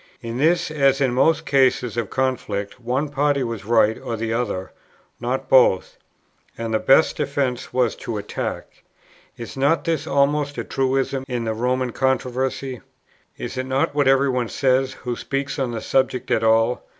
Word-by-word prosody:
In 115 +1 -4
this, 165 +2 +2
as 140 -3 +2
in 130 -3 +1
most 155 +5 +2
cases 130 -4 +2
of 115 -4 -2
conflict, 125 -5 -2
one 130 +5 -1
party 145 -1 +1
was 115 -4 -5
right 110 -1 +3
or 115 - -4
the 115 0 -2
other, 105 -6 -2 0.5
not 125 +2 -2
both; 125 -8 +4 0.6
and 115 -1 -3
the 110 - +2
best 135 +8 +4
defence 135 -3 -2
was 125 -3 +1
to 115 - -5
attack. 105 0 -5 0.6
Is 115 -2 -8
not 140 +5 +2
this 160 -2 -1
almost 145 +1 +1
a - - -2
truism 135 0 -1
in 125 -3 -2
the 110 -1 -1
Roman 125 +2 -1
controversy? 130 0 -1 0.6
Is 130 - -5
it 130 - -3
not 135 +2 0
what 145 -2 +2
every 135 +1 +4
one 125 -3 -1
says, 130 0 +1
who 125 -2 -5
speaks 140 +3 -3
on 130 -2 0
the 115 -2 -4
subject 130 -2 0
at 110 - +2
all? 115 +2 +2
130 Hz, 170 wpm, -22 LUFS, 115-135 Hz, 0.6 s, both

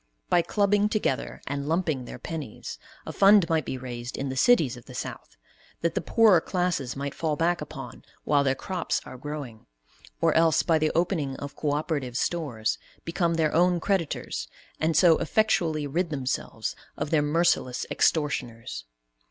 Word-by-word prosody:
By 175 - +5
clubbing 205 +2 +2
together 210 - -2
and 140 +1 -3
lumping 160 -6 0
their - - -8
pennies, 155 -9 -6 0.3
a - - -6
fund 195 -2 +6
might 160 -4 +1
be 130 - -3
raised 120 -1 -6
in 135 0 -3
the 130 - -4
cities 150 - +4
of 120 - -13
the - - -11
South - - -7 0.4
that 170 -1 +1
the - - -1
poorer 215 -7 +5
classes 175 -10 -1
might 140 0 -4
fall 155 -2 -1
back 170 +3 +1
upon - - -8 0.2
while 145 -1 +3
their 135 -1 +2
crops 185 +3 -2
are - - -9
growing; 135 -4 -7 0.5
or - - +3
else, 165 -1 +4
by 165 -2 +3
the 155 0 +1
opening 165 -6 0
of 140 0 -7
co 145 -2 -1
operative 145 -5 -2
stores, 135 -12 -1 0.3
become 170 0 0
their 155 -2 +1
own 175 +1 +3
creditors 165 - -1 0.3
and 160 0 +1
so 170 -2 +6
effectually 165 -5 +1
rid 165 +5 -1
themselves 135 -4 -3 0.2
of 150 - -3
their 155 -2 +4
merciless 145 -4 +1
extortioners. 115 - 0
155 Hz, 165 wpm, -26 LUFS, 135-175 Hz, 0.5 s, fund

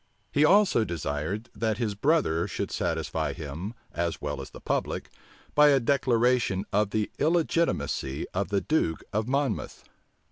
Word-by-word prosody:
He 145 - +3
also 190 - +5
desired, 85 +5 -3
that 110 -2 -1
his 110 -3 -1
brother 105 - +2
should - - -4
satisfy - - -1
him, 80 +10 -6 0.2
as 85 -1 -2
well - - -4
as - - -8
the - - -11
public, - - -2 0.4
by 150 0 +7
a 140 -2 +5
declaration 120 -6 +2
of 105 0 +2
the 105 0 -1
illegitimacy 160 - 0
of 100 +2 0
the 100 -1 +1
duke 150 - 0
of 110 +2 0
Monmouth. 140 +1 -1
110 Hz, 145 wpm, -27 LUFS, 95-140 Hz, 0.4 s, by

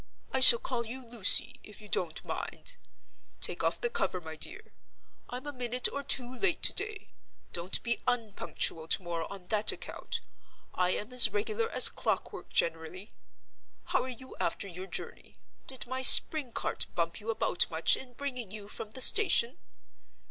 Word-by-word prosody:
I 265 - -1
shall 255 -2 +10
call 235 -1 -5
you 255 +2 -10
Lucy, 230 -5 +2
if 210 - -13
you 210 - -14
don't 170 -5 -4
mind. - - -7 0.6
Take - - -1
off - - -1
the 475 - -3
cover, 470 - -3
my 160 -2 -10
dear—I'm 250 - -9
a 290 - -7
minute 250 -1 -1
or 280 - -5
two 255 -2 -2
late 380 -4 0
to - - +4
day. 425 +2 -4 0.4
Don't 175 +2 0
be 235 0 -3
unpunctual 210 -8 -2
to 185 - 0
morrow 170 -1 -6
on 195 -2 -11
that 215 0 +4
account; 465 -1 -8 0.5
I 180 0 -1
am 210 +6 -4
as 250 - +7
regular 435 +2 -4
as - - +6
clock - - -4
work - - -11
generally. 165 +4 -4 0.7
How - - -2
are 260 - -7
you 260 +1 -12
after 170 +3 -4
your 185 +1 -10
journey? - - -7 0.3
Did 260 -1 -2
my 260 +2 -5
spring 270 0 +9
cart - - -3
bump 170 +2 -4
you 220 +1 -10
about 220 -5 -1
much 160 0 +1
in 255 -2 -12
bringing 250 -5 -7
you 205 0 -10
from 215 - -9
the 260 +4 -10
station? 315 - +4
235 Hz, 170 wpm, -28 LUFS, 185-260 Hz, 0.7 s, shall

